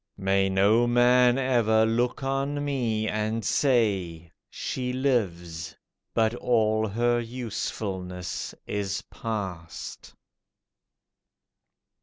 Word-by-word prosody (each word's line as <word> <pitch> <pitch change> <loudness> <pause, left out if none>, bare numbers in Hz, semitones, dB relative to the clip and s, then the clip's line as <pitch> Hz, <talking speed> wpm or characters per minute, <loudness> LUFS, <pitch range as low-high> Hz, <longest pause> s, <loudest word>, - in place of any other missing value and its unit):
May 95 0 +2
no 105 +5 +4
man 125 +1 +5
ever 115 -4 +3
look 120 +4 0
on 140 +2 -1
me 115 -6 -1
and 110 +1 -1
say, 100 - +1 0.2
"She 125 -1 -3
lives, 90 - -1 0.4
but 110 0 +3
all 110 -3 +1
her 120 +3 +1
usefulness 100 -6 -4
is 100 -1 -3
past." 95 -7 -6
110 Hz, 85 wpm, -26 LUFS, 95-125 Hz, 0.4 s, man